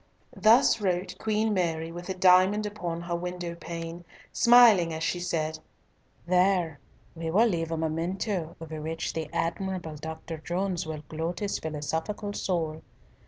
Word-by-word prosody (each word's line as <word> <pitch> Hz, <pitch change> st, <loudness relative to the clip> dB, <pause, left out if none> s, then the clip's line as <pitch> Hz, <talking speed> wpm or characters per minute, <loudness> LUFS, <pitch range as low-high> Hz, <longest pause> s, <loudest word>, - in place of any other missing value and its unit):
Thus 230 Hz, +1 st, +5 dB
wrote 180 Hz, -1 st, -1 dB
Queen 220 Hz, 0 st, +1 dB
Mary 165 Hz, -3 st, -1 dB
with 175 Hz, +2 st, -8 dB
a 190 Hz, -, -2 dB
diamond 185 Hz, +3 st, +5 dB
upon 175 Hz, -5 st, -4 dB
her 170 Hz, 0 st, -3 dB
window 175 Hz, 0 st, -4 dB
pane, 170 Hz, 0 st, -7 dB, 0.3 s
smiling 235 Hz, -8 st, +7 dB
as 160 Hz, -, -4 dB
she 170 Hz, +2 st, 0 dB
said, 160 Hz, -3 st, -2 dB, 0.7 s
"There, 180 Hz, -3 st, +2 dB, 0.3 s
we 165 Hz, -1 st, -4 dB
will 205 Hz, +8 st, +4 dB
leave 165 Hz, -7 st, 0 dB
a 165 Hz, -, -1 dB
memento 170 Hz, +2 st, -2 dB
over 160 Hz, -1 st, -7 dB
which 160 Hz, +1 st, -3 dB
the 160 Hz, -2 st, -4 dB
admirable 175 Hz, -2 st, -2 dB
Dr. 160 Hz, +1 st, -7 dB
Jones 175 Hz, +1 st, -2 dB
will 155 Hz, -1 st, -5 dB
gloat 165 Hz, +2 st, -3 dB
his 205 Hz, -1 st, -1 dB
philosophical 160 Hz, +7 st, -3 dB
soul. 160 Hz, -6 st, -2 dB
170 Hz, 145 wpm, -28 LUFS, 160-190 Hz, 0.7 s, smiling